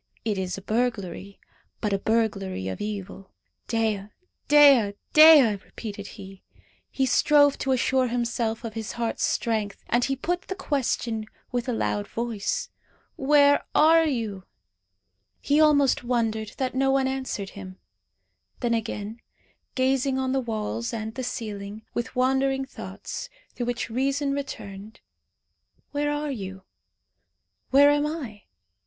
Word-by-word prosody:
It 210 -3 0
is 185 -1 -3
a 195 - -9
burglary, 200 -4 -2 0.4
but 210 -2 -1
a 195 - +1
burglary 200 - -1
of 95 - -5
evil. 200 -2 -6 0.4
"Dea! 220 -4 0 0.4
Dea! 275 -9 +6 0.2
Dea!" 305 -8 +8
repeated 205 -3 -8
he. 195 -2 -11 0.5
He 265 - 0
strove 285 +2 +4
to 270 - -1
assure 260 0 +2
himself 235 -1 -2
of 225 -2 -5
his 220 -1 -5
heart's 235 -1 -3
strength. 215 -3 -1
And 240 +1 +2
he 270 - 0
put 350 +7 -3
the 380 - -4
question 240 - -2 0.2
with 245 0 -2
a - - 0
loud 205 -2 -1
voice 230 -3 -3 0.5
"Where 285 +1 +4
are 325 +1 +6
you?" 220 -9 -3 0.9
He 290 +2 +2
almost 285 -4 +4
wondered 225 -3 -1
that 260 -1 -1
no 270 +1 +2
one 270 -1 +2
answered 260 -7 -4
him. 190 -2 -10 0.8
Then 240 -2 +1
again, 220 0 -4 0.5
gazing 265 +1 +1
on 260 0 -1
the 270 - +1
walls 230 0 -3
and 220 0 -4
the 260 - -5
ceiling, 210 -2 -5
with 240 +3 -4
wandering 265 +1 +1
thoughts, - - -7 0.2
through 240 - -4
which 245 -1 -3
reason 275 +3 0
returned. 215 -7 -7 0.9
"Where 290 0 0
are 295 0 -2
you? 190 -6 -6 1.1
Where 285 +2 +6
am 290 0 +2
I?" 260 -10 -6
235 Hz, 135 wpm, -25 LUFS, 210-270 Hz, 1.1 s, Dea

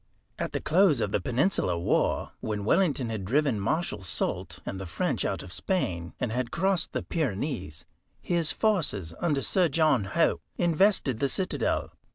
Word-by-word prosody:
At - - -2
the - - -1
close 170 -4 +4
of 105 - -1
the 100 - +1
Peninsular 125 - +1
War, 85 - +1
when 105 -2 -3
Wellington 145 - +2
had 110 -3 -3
driven 130 +2 +1
Marshal 110 - -1
Soult 85 -4 -3
and 95 - -4
the 95 - -6
French 85 - -1
out - - -2
of 90 - -9
Spain, 85 - -1
and 120 - -1
had 125 +1 -1
crossed 185 +8 0
the - - -2
Pyrenees, 125 - -3 0.3
his 170 -3 0
forces, 150 - 0
under 145 -5 +1
Sir 185 -2 +2
John 150 -7 +3
Hope, 165 +12 +2 0.2
invested 170 - +2
the 140 - +1
citadel. 185 +5 -1
135 Hz, 165 wpm, -28 LUFS, 100-170 Hz, 0.3 s, close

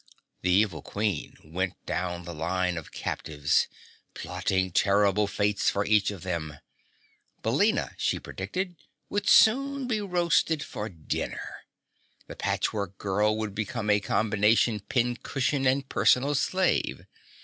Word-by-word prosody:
The 90 - 0
evil 90 -4 +2
Queen 105 +4 -3
went 90 +4 -3
down 90 -1 -3
the 85 - -6
line 90 +3 -1
of 80 -3 -7
captives, 75 -2 0 0.5
plotting 95 -1 -1
terrible 100 +2 +3
fates 100 0 +1
for 100 +1 -1
each 105 -1 +3
of 100 -5 -7
them. 80 -5 -4 0.9
Billina, - - +1
she - - +1
predicted, 175 - -4 0.4
would 205 -1 0
soon 275 +4 +5
be 225 -4 -1
roasted 170 -5 +1
for 105 +2 -5
dinner. 80 -5 -5 0.6
The - - -9
Patchwork 100 -3 -2
Girl 105 +2 +1
would 110 -2 -3
become 105 +1 -2
a 105 - +4
combination 110 +2 +2
pin 120 +3 0
cushion 135 0 0
and 135 +1 +1
personal 135 +3 +3
slave. 185 +6 0
105 Hz, 125 wpm, -27 LUFS, 95-135 Hz, 0.9 s, soon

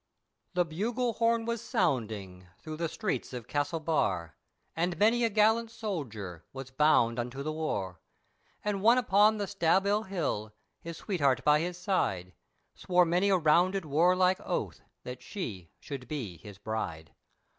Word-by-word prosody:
THE 180 -1 +3
bugle 230 +9 -1
horn 230 0 +1
was 235 -1 -2
sounding 110 - -2
through 155 -1 -8
the 165 0 -1
streets 200 -5 -3
of 120 -2 -6
Castlebar, 145 - -1 0.4
And 175 +1 -1
many 225 +5 +3
a 230 - +3
gallant 220 +2 +3
soldier, 115 - -5
was 135 0 -8
bound 125 -5 +3
unto 125 +3 -4
the 155 - -2
war, 100 - -3 0.6
And 205 -2 -1
one 230 +4 +6
upon 215 -2 +4
the 205 - -1
Staball 200 +3 +1
hill, 125 - -3 0.2
his 170 -1 -8
sweetheart 140 - 0
by 150 0 +5
his 175 +2 -3
side 95 - -1 0.4
Swore 180 -1 +2
many 180 +4 +2
a 190 - +4
rounded 175 +3 +3
warlike 180 +5 +3
oath, - - -3 0.2
that 125 0 -7
she 100 - -6
should 135 -4 -7
be 115 - -5
his 100 +4 -12
bride. 100 -7 -4
165 Hz, 145 wpm, -30 LUFS, 125-200 Hz, 0.6 s, one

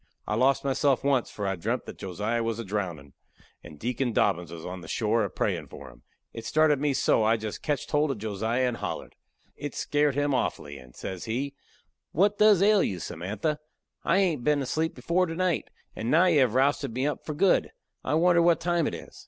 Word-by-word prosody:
I - - -1
lost 130 +5 +2
myself 140 0 +1
once, 135 -3 +1
for 105 - -5
I 95 0 0
dreampt 85 - -2
that - - -10
Josiah 105 +5 -2
was 115 -1 -2
a 115 - -5
drowndin', 90 -9 -4 0.5
and 75 - -11
Deacon 120 - -2
Dobbins 90 -6 +1
was 85 -1 -8
on 90 0 -6
the 80 - -11
shore 110 +4 +1
a 100 - -2
prayin' - - -2
for - - -11
him. - - -20 0.3
It 115 - -7
started 155 -2 +3
me 145 -1 +1
so 130 - +2
that 110 - +2
I 110 +1 +3
jist 110 -1 -6
ketched 145 -3 -2
hold 150 0 +2
of 135 - -2
Josiah 110 +4 -1
and 120 -1 -2
hollered. - - -5 0.4
It 145 0 -6
skairt 145 -2 +1
him 145 0 +1
awfully, 75 - -2
and 65 -1 -16
says 95 -2 -6
he, 135 +5 -2 0.6
"What 205 +5 +2
does 210 -3 +6
ail 210 -1 +5
you, 95 - -1
Samantha? 100 - -3 0.4
I 170 - +2
hain't 170 -10 +1
been 145 0 +2
asleep 160 +5 -1
before 180 +2 +1
to 165 - -5
night, 180 -2 0 0.3
and 115 - -3
now 165 +6 +5
you 170 -5 +4
have 125 -3 +3
rousted 135 -2 +1
me 130 +2 0
up 150 - -2
for 155 - -5
good. 190 +4 +3 0.3
I 145 - 0
wonder 170 +1 +4
what 170 0 +4
time 175 -2 +1
it - - -3
is!" - - -11
130 Hz, 220 wpm, -27 LUFS, 105-155 Hz, 0.6 s, does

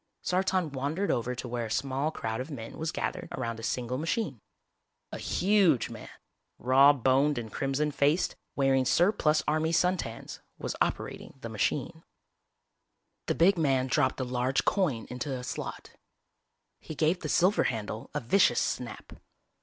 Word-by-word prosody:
Sartan 185 -3 0
wandered 145 +9 -1
over 125 +2 -1
to 125 - -6
where 120 -1 -3
a - - -10
small 135 +5 -1
crowd 110 -6 -4
of 130 - -7
men 115 -6 -8
was 160 0 -2
gathered - - -3
around 115 -3 -3
a - - -7
single 125 +2 -2
machine. 160 - -2 0.7
A - - -6
huge 190 - +2
man, - - -9 0.5
raw 135 +3 +6
boned 135 +2 +2
and 115 -2 -5
crimson 140 +2 0
faced, 145 +4 +1 0.2
wearing 135 -1 +3
surplus 155 - +3
army 155 +1 +1
suntans, 170 -9 -1 0.2
was - - -4
operating - - -2
the - - -6
machine. - - -2 1.2
The - - +1
big 175 +3 +4
man 135 -4 +2
dropped 130 0 +1
a - - 0
large 125 +1 0
coin 150 - +1
into 125 +3 -4
a 125 - -7
slot. - - -6 0.9
He 155 - -8
gave 160 +4 +2
the 155 - -5
silver 185 -1 +3
handle 110 -2 -3
a 150 - 0
vicious 120 0 +3
snap. 120 -4 -4
135 Hz, 155 wpm, -29 LUFS, 125-160 Hz, 1.2 s, raw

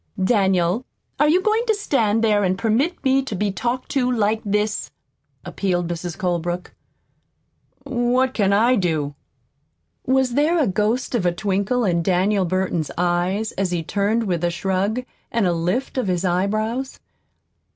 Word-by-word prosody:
"Daniel, 190 0 +2 0.4
are 295 +1 +4
you 360 +4 +3
going 435 +3 +2
to 440 - +3
stand 230 - +1
there 210 -2 +3
and 185 0 +1
permit 245 - 0
me 265 0 +3
to 260 -6 -5
be 205 +1 0
talked 240 +6 -3
to 255 -2 +1
like 220 -2 +1
this?" 210 +1 -1 0.6
appealed 175 -3 -1
Mrs. 175 0 -5
Colebrook. 175 0 -2 1.1
"What 255 0 +1
can 200 -3 +2
I 230 +5 +4
do?" 155 -6 -1 0.9
(Was 260 -1 +1
there 305 +6 +2
a 310 - +3
ghost 215 +7 0
of 235 -6 +1
a 175 - +2
twinkle 200 +6 0
in 170 -3 +1
Daniel 190 +3 +2
Burton's 180 -3 -1
eyes 180 +5 0
as 195 -1 -1
he 175 -2 -2
turned 205 +6 0
with 175 -5 -2
a 175 - +2
shrug 190 +6 -1 0.3
and 230 -3 +1
a 175 - +2
lift 180 +11 -1
of 250 - -1
his 180 0 0
eyebrows?) 215 +8 -1
205 Hz, 155 wpm, -22 LUFS, 180-245 Hz, 1.1 s, are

